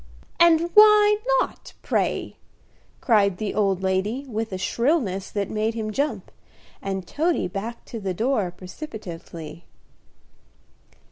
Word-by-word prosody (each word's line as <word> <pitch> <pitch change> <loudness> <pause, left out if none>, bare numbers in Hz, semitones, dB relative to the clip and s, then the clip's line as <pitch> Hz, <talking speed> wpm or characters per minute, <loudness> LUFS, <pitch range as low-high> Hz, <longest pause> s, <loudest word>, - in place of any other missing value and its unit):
"And 340 0 +5
why 420 0 +7 0.2
not, - - -4
pray?" - - -1 0.7
cried 200 -6 +3
the 210 0 -3
old 195 -3 +1
lady, 195 +8 -1
with 225 -2 -3
a 185 - -3
shrillness 225 - 0
that 200 -2 -2
made 220 +1 -1
him 215 -1 -3
jump, 285 +7 -2 0.5
and 195 -1 -3
Toady 325 - 0
back 210 +6 -6
to 230 - -7
the 190 -3 -3
door 220 -2 0
precipitately. 175 - -9
215 Hz, 120 wpm, -24 LUFS, 190-275 Hz, 0.7 s, why